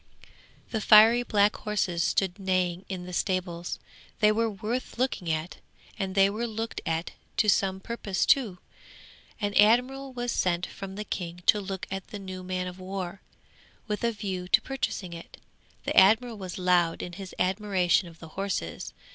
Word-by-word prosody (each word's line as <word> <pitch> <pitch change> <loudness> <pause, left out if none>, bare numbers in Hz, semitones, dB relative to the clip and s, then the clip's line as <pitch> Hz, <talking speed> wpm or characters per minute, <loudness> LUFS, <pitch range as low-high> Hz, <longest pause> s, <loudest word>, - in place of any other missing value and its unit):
'The 220 - -1
fiery 220 +3 +8
black 210 -3 +3
horses 190 -5 -1
stood 190 +2 +1
neighing 185 -2 0
in 185 -2 -5
the 180 - -8
stables; 175 -2 -2 0.4
they 210 -1 +5
were 225 +1 +1
worth 220 +6 -4
looking 245 -9 -1
at, 160 +2 -3 0.4
and 190 -1 -2
they 195 0 +6
were 220 +4 -2
looked 225 +1 -4
at 165 +1 -1 0.3
to 215 - +3
some 190 -2 +2
purpose 200 -2 -2
too. 225 -10 +3 0.8
An 205 -2 -1
admiral 250 +6 +3
was 245 -1 -3
sent 180 -3 +1
from 195 -1 -8
the 210 - -4
King 175 -2 -5
to 210 - +5
look 190 -1 -5
at 195 0 -4
the 210 - -7
new 190 -2 -7
man 185 0 -2
of 180 0 -7
war, 185 0 -5 0.7
with 210 +1 -3
a 235 - +2
view 190 -4 -4
to - - +6
purchasing 210 -9 -3
it. 170 0 -10 0.5
The - - -2
admiral 220 +3 +5
was 185 -2 -6
loud 180 -2 +2
in 175 - -6
his 190 +1 -8
admiration 185 -2 +2
of 165 -1 -13
the 165 - -11
horses. 190 - -4
195 Hz, 170 wpm, -28 LUFS, 180-215 Hz, 0.8 s, fiery